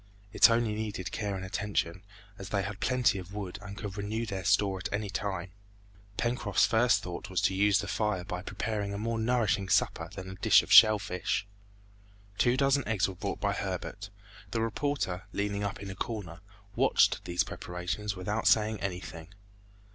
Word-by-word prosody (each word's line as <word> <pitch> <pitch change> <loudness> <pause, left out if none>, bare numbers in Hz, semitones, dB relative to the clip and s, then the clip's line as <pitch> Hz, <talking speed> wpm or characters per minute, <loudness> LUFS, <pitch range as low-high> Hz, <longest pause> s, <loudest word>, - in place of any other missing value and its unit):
It - - +7
only 115 -2 +2
needed 105 -4 -4
care 100 -3 -2
and 95 0 -5
attention, 95 -3 -2 0.4
as 95 0 -7
they 100 -2 0
had 100 +1 -5
plenty 125 -5 +2
of 95 +2 -10
wood 100 -1 -5
and 100 0 -9
could 105 -1 -6
renew 110 +3 -2
their 95 -4 -4
store 95 +2 +2
at - - -5
any 100 -1 -2
time. 95 -3 -3 0.7
Pencroft's 120 +2 +1
first 120 +1 +3
thought 90 -1 -6
was 95 -2 0
to - - +2
use 100 +1 +4
the 100 0 -3
fire 105 -3 -1
by 90 0 -5
preparing 100 0 -3
a - - -3
more 115 +2 -2
nourishing 110 -5 +1
supper - - +1
than 95 - -7
a 95 - -7
dish 95 - +5
of - - -9
shell 110 0 +9
fish. 95 -1 -2 0.9
Two 125 0 +3
dozen 140 0 +2
eggs 105 -4 +1
were 95 - -5
brought 90 - -4
by - - 0
Herbert. 100 -1 -4 0.4
The 115 - -1
reporter 115 -6 -2
leaning 100 0 -1
up 100 - -3
in 95 - -6
a - - -7
corner, 95 -5 -5 0.4
watched - - +3
these 85 0 +1
preparations 90 +4 -4
without 105 +4 -2
saying 110 -1 +3
anything. 90 -3 -5
100 Hz, 180 wpm, -30 LUFS, 95-110 Hz, 0.9 s, shell